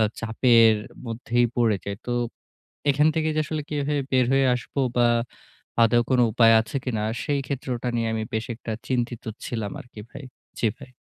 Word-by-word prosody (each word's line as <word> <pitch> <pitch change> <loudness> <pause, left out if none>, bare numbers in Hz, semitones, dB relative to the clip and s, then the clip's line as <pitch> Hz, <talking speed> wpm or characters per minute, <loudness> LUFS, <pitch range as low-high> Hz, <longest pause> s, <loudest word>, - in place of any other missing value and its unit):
আ - - +5 0.2
চাপের 115 -1 +4 0.3
মধ্যেই 120 +1 0
পড়ে 115 -4 +3
যাই। 100 0 -4
তো 120 - -1 0.8
এখান 145 +2 +3
থেকে 160 -1 0
যে 155 - +3
আসলে 155 -1 -3
কিভাবে 145 0 -1
বের 130 -2 +3
হয়ে 135 0 +4
আসব 125 - -7 0.2
বা 120 -1 +4 0.7
আদৌ 115 +1 +5
কোনো 125 -1 +4
উপায় 115 0 +6
আছে 115 +5 -5
কিনা 110 -5 -2 0.2
সেই 145 -1 0
ক্ষেত্রটা 125 -2 -3
নিয়ে 115 -1 0
আমি 110 0 -2
বেশ 110 0 -2
একটা 115 0 -6 0.2
চিন্তিত 120 -2 -2 0.2
ছিলাম 110 -4 -4
আরকি 120 -3 -12
ভাই। 140 - -9 0.4
জি 115 - +3
ভাই। 140 -2 -12
120 Hz, 175 wpm, -24 LUFS, 115-135 Hz, 0.8 s, উপায়